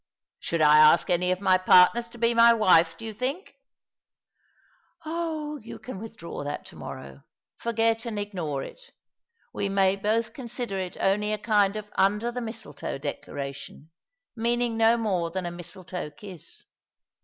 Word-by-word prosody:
" - - -67
Should 165 -2 -1
I 150 0 +7
ask 155 +4 +6
any 180 +1 +2
of 185 - -1
my 185 -2 +4
partners 185 +6 +5
to 235 +1 -13
bo 235 0 +2
my 235 0 +7
wife, 170 -6 +4
do 225 - -9
you 220 - -5
think?" 265 - -4 0.8
" - - -35
Oh, 315 -2 -3
you 230 -4 -10
can 250 -7 -8
withdraw 215 -8 -8
that 145 0 -5
to - - -13
morrow 70 0 -9 0.2
— - - -67
forget 225 0 0
and 220 -2 -4
ignore 175 -9 -3
it. - - -11 0.7
We 200 - -2
may 195 -1 +3
both 220 +3 -1
consider 240 -5 -4
it 185 -1 -5
only 210 +2 +1
a - - -1
kind 210 -2 +2
of 210 -1 -7
under 210 +5 +1
the 250 +1 -4
mistletoe 220 - -6
declaration, 140 +1 -7 0.4
meaning 240 0 0
no 225 +1 +4
more 190 -7 -1
than 185 +1 -4
a 175 - -3
mistletoe 175 0 -7
kiss. 180 +2 -12
205 Hz, 165 wpm, -26 LUFS, 175-230 Hz, 0.8 s, I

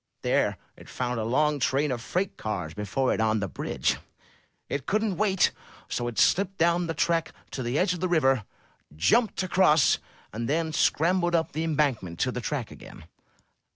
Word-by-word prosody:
There - - +1 0.2
it - - -15
found 125 -2 -2
a - - -1
long 150 +6 +1
train 140 +2 +1
of 120 -2 -3
freight 185 +9 -2
cars 95 -7 -4
before 105 +7 -1
it - - -1
on 110 -1 +2
the 100 - -2
bridge. - - -1 0.7
It 140 -2 -4
couldn't 210 -3 0
wait, 195 -2 +3 0.4
so 120 - -2
it 120 -3 -6
slipped 195 +1 +2
down 170 +1 +2
the 165 - -3
track 170 -1 +1 0.2
to 130 - -4
the 120 +3 -1
edge 180 +2 +2
of 175 - -5
the 185 +1 -1
river, 135 -8 +3 0.5
jumped 215 - +2
across, 175 -5 +4 0.3
and 115 +3 -3
then 160 +1 0
scrambled 175 +3 +2
up 165 -1 0
the 155 +2 -2
embankment 140 - 0
to 130 - +1
the 125 - -4
track 130 -4 -3
again.' - - -12
150 Hz, 180 wpm, -27 LUFS, 120-175 Hz, 0.7 s, across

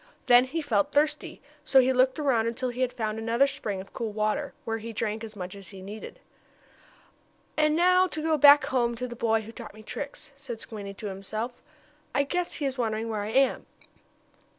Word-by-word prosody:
Then 245 +1 +7
he 315 +5 -3
felt 215 -8 +1
thirsty, 295 -1 0 0.2
so 275 -3 +5
he 260 0 +4
looked 255 0 +3
around 260 -7 +2
until 250 +2 -2
he 245 +1 -5
had 255 -1 +1
found 220 -2 -3
another 230 +4 +3
spring 210 -8 -3
of 190 - -10
cool 225 -2 -3
water, 215 +7 -1
where 225 0 -2
he 230 +1 -7
drank 220 0 -2
as 220 -1 -8
much 180 -2 -6
as 200 -2 -9
he 195 - -11
needed. 205 +3 -9 1.4
"And 305 0 +3
now 365 +2 +5
to 315 - -4
go 320 0 +2
back 290 0 +8
home, 240 -2 +1
to 250 +2 -4
the 240 - -8
boy 225 -1 +1
who 220 +1 -10
taught 215 - -10
me 215 - -13
tricks," 285 +5 -7
said 270 -5 -7
Squinty 205 -4 -7
to 215 - -9
himself. 215 +5 -5 0.5
"I 280 - +4
guess 355 +5 -2
he 295 - -3
is 270 -1 -2
wondering 225 -1 -1
where 215 -2 -2
I 205 - -4
am." 265 +3 +2
235 Hz, 205 wpm, -27 LUFS, 215-275 Hz, 1.4 s, back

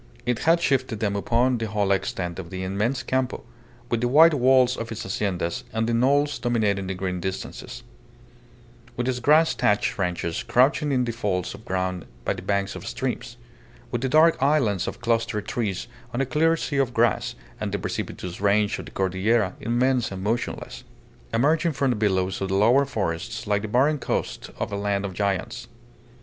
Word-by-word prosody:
It 125 -2 0
had 165 +2 +4
shifted 130 -7 0
them 100 -2 0
upon 120 +4 +1
the 115 - -2
whole 105 -2 0
extent 90 -2 -1
of 85 -3 -7
the 95 0 -5
immense 105 +7 -1
Campo, 130 0 -1 0.4
with 120 -2 -1
the 120 - +2
white 160 +6 +7
walls 130 -2 +4
of 115 -1 -6
its 115 0 -5
haciendas 95 -3 -2
on 110 0 +1
the 115 - 0
knolls 140 +5 +2
dominating 105 -5 0
the 95 - -3
green 90 -1 -3
distances; 90 -9 -6 1.1
with 120 +1 -1
its 125 -1 0
grass 155 +6 +4
thatched 105 0 +1
ranches 90 -3 -1
crouching 140 +4 +2
in 125 -2 +2
the 120 - -2
folds 100 -6 -2
of 105 +3 -12
ground 95 -3 -2 0.2
by - - +1
the - - -8
banks 100 +1 -1
of 95 +1 -8
streams; 120 0 -4 0.5
with 120 - -2
the 130 - 0
dark 155 +1 +5
islands 130 -10 +2
of - - -6
clustered 115 -3 0
trees 105 -7 -2 0.3
on - - -1
a 135 - +2
clear 160 +5 +2
sea 145 -3 -3
of 130 -3 0
grass, 115 -3 +1 0.2
and - - -3
the - - -1
precipitous 90 +1 -5
range 105 0 +2
of - - -7
the - - -11
Cordillera, 95 +2 +1
immense 120 +1 +1
and 95 -1 -6
motionless, 115 +4 -3 0.5
emerging 155 +8 +2
from 135 -1 +1
the - - 0
billows 95 -3 0
of 95 - 0
the 95 - 0
lower 120 +8 +4
forests 95 -11 -3
like 105 -1 +1
the 110 - -4
barren 135 +7 +2
coast - - -3
of - - -3
a - - -2
land 100 0 -1
of 95 - -5
giants. 100 +3 -2
115 Hz, 190 wpm, -24 LUFS, 100-130 Hz, 1.1 s, white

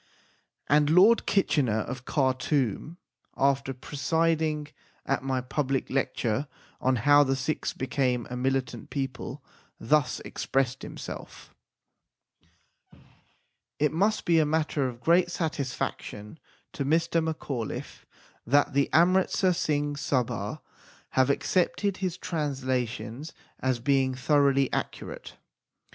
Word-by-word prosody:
And 150 +1 +4
Lord 195 +8 +5
Kitchener 140 - +2
of 125 +3 -6
Khartoum, 135 - 0 0.4
after 135 0 +2
presiding 155 +3 0 0.4
at 135 - 0
my 130 -1 -1
public 135 +1 -2
lecture 135 0 -1 0.3
on 130 0 +2
How 145 +5 +5
the 135 -1 0
Sikhs 135 +4 -2
became 125 -2 -1
a - - -3
Militant 130 -2 -2
People, 135 -2 -4 0.4
thus 145 +2 +2
expressed 135 -1 -1
himself: - - -9 2.2
It 150 0 +2
must 205 +6 +1
be 170 -1 +4
a - - +5
matter 150 -2 0
of 120 -1 -11
great 170 +5 +4
satisfaction 145 - -4 0.3
to 140 - -2
Mr. 165 +3 +1
Macauliffe 140 -8 -4 0.4
that 145 +4 +2
the 140 0 +2
Amritsar 185 +2 +3
Singh 145 -3 -1
Sabha 130 -4 -2 0.5
have 130 0 +3
accepted 185 +6 +1
his 185 -2 -2
trans 145 -7 -3
lations 125 +2 -3 0.3
as 130 -2 0
being 130 0 +1
thoroughly 140 0 +2
accurate. - - -5
140 Hz, 110 wpm, -27 LUFS, 130-160 Hz, 2.2 s, Lord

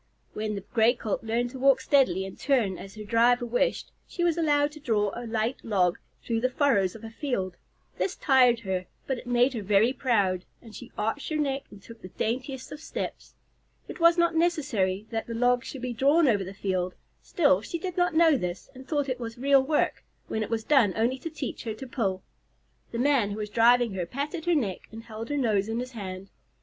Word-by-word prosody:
When 215 0 -3
the 200 - -4
Gray 230 +1 +4
Colt 220 -2 -3
learned 235 +2 -1
to 260 - -8
walk 270 0 +5
steadily 260 -9 +2
and 190 - -8
turn 230 -10 0
as 195 +1 -10
her 215 - -7
driver 235 +3 +3
wished, 245 - 0 0.2
she 345 - -3
was 340 -2 +2
allowed 295 -3 +2
to 305 - -12
draw 215 -7 0
a 240 0 -6
light 225 +2 -1
log 185 -6 +1 0.2
through 230 -1 -1
the 255 - +2
furrows 245 -9 +2
of 225 - -11
a 225 - -7
field. 210 -9 -3 0.4
This 390 - -1
tired 250 -4 +4
her, 185 -3 -3 0.2
but 265 -2 -2
it - - -12
made 245 +2 +3
her 230 - -3
very 205 +5 +3
proud, 200 -9 +1 0.2
and 225 -2 -14
she 245 0 -10
arched 225 +7 -2
her 310 - -2
neck 275 -2 -1
and 200 -1 -14
took 230 -1 -13
the - - -8
daintiest 255 +7 -4
of 295 - -8
steps. - - -6 0.5
It - - -8
was 335 +1 +5
not 340 0 +3
necessary 265 - 0
that 225 -1 -3
the 230 - -5
log 245 +1 +2
should 265 -3 -8
be 250 -1 -2
drawn 285 +7 +4
over 205 -5 +2
the 190 - -7
field; 185 -2 -2 0.3
still, 285 - +2
she 335 - -4
did 360 +1 -5
not 355 -3 +1
know 320 -3 +5
this, 180 -5 -5
and 260 0 -12
thought 290 -3 0
it 255 -1 -3
was 230 -1 -6
real 275 +2 +4
work, 295 +3 0 0.2
when 220 - -2
it 215 - -3
was 225 -1 -1
done 235 -8 +4
only 240 +4 0
to 330 - -5
teach 295 -5 -6
her 220 -2 -3
to 265 - -8
pull. 195 -7 -2 0.7
The 230 - -4
man 255 -4 +2
who 205 - -5
was 210 -1 -5
driving 235 0 +4
her 180 -3 -3
patted 295 - -4
her 350 -1 +3
neck 210 - -2
and 225 +1 -9
held 225 0 -8
her 290 - -1
nose 215 -6 +1
in 225 - -2
his 250 +1 -5
hand. 195 -4 -7
240 Hz, 225 wpm, -27 LUFS, 210-275 Hz, 0.7 s, walk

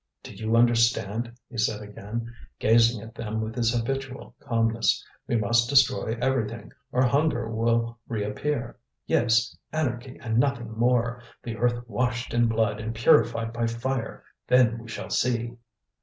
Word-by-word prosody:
"Do - - -9
you 110 +1 -1
understand?" 115 -1 +2 0.2
he 120 - -7
said 110 0 +1
again, 105 +3 -6 0.2
gazing 115 0 +3
at 115 0 -11
them 110 -1 -4
with 110 0 -3
his 115 -1 +1
habitual 130 +3 -3
calmness; 115 -1 +1 0.2
"we - - 0
must 115 +2 +2
destroy 130 -4 +3
everything, 120 -3 -1 0.2
or 125 - +2
hunger 125 -3 +1
will 115 +1 0
reappear. 120 +4 -3 0.3
Yes, 115 -1 +2 0.2
anarchy 130 -4 -3
and 115 -1 0
nothing 125 -4 0
more; 120 +1 +1 0.2
the 115 -1 -5
earth 120 +1 0
washed 125 +1 -2
in 120 0 +3
blood 110 -2 0
and 110 +1 -4
purified 115 0 +3
by 115 0 0
fire! 115 +1 -3 0.2
Then 120 -2 +4
we 115 - -11
shall 115 - -7
see!" 120 -1 0
115 Hz, 145 wpm, -26 LUFS, 115-120 Hz, 0.3 s, Then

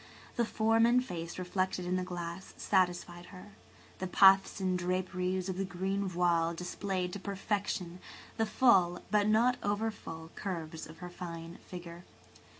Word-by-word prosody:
The 235 - +2
form 225 +1 +3
and 250 +1 +3
face 170 -4 -5
reflected 185 0 -1
in 180 +1 0
the 185 - 0
glass 175 0 -6
satisfied 175 -2 0
her. 185 +3 -11 0.5
The 185 - -2
puffs 195 +2 +6
and 185 -1 +1
draperies 185 +1 -1
of 185 -1 -3
the - - +1
green 195 +1 -2
voile 170 -2 +2
displayed 180 +1 -3
to 200 - -4
perfection 195 -3 -2 0.4
the 225 -1 +1
full, 185 -8 +4
but 210 -1 +3
not 235 +4 +4
over 205 +2 0
full, 160 -5 -9
curves 165 -5 -5
of 160 +1 -12
her - - -6
fine 170 -1 -7
figure. 175 -1 -8
185 Hz, 150 wpm, -32 LUFS, 175-200 Hz, 0.5 s, puffs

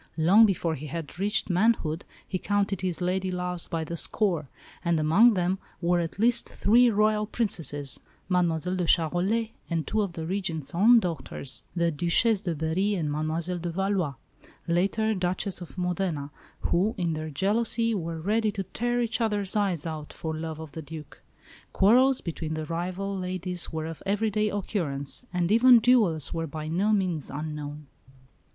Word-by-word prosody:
Long 195 +8 +6
before 175 -4 0
he 150 0 -6
had 165 +3 -6
reached 205 +2 +1
manhood 180 -4 +1 0.2
he 185 - -3
counted 200 -1 0
his 180 -2 -2
lady 185 +1 0
loves 180 -1 -1
by 165 -2 -2
the 170 +2 -5
score; 170 -4 +1 0.4
and 170 -2 +1
among 200 +10 +5
them 180 +1 0 0.2
were 175 0 +2
at 170 0 -3
least 235 +4 +2
three 240 +4 +4
Royal 215 0 +2
Princesses, 165 - -2 0.3
Mademoiselle 180 -1 +1
de 180 -2 -1
Charolais, 185 +9 +1 0.2
and 165 -2 -1
two 220 - 0
of 195 -4 -2
the 160 -1 -5
Regent's 175 -5 -3
own 225 +7 +6
daughters, 155 - -3
the 170 -1 +1
Duchesse 175 +7 +2
de 175 -5 -2
Berry 170 +7 0
and 155 -5 -1
Mademoiselle 160 +4 -1
de 175 +1 -3
Valois, 185 -4 -1 0.5
later 200 +6 +1
Duchess 185 0 -2
of 175 - -10
Modena, 180 -5 -2 0.3
who, 195 +6 +1
in 170 -3 0
their 155 0 -4
jealousy, 230 - +1
were 165 -4 -3
ready 215 +5 +1
to 200 -2 -3
"tear 240 +5 -1
each 235 0 -1
other's 205 -3 -1
eyes 190 -7 0
out" 155 -2 -6
for 160 -1 -4
love 160 0 -5
of 160 -2 -8
the 160 - -6
Duc. 155 0 -10 0.5
Quarrels 255 +6 +4
between 160 -2 -4
the 155 0 -4
rival 185 +4 -3
ladies 180 -1 -4
were 160 -1 -3
of 165 -1 -7
everyday 210 +1 +1
occurrence; 180 - -2
and 180 0 0
even 245 +2 +7
duels 215 - +3
were 165 -1 -2
by 155 +1 -6
no 185 +7 +1
means 185 -8 0
unknown. 150 0 -6
180 Hz, 165 wpm, -27 LUFS, 160-205 Hz, 0.5 s, even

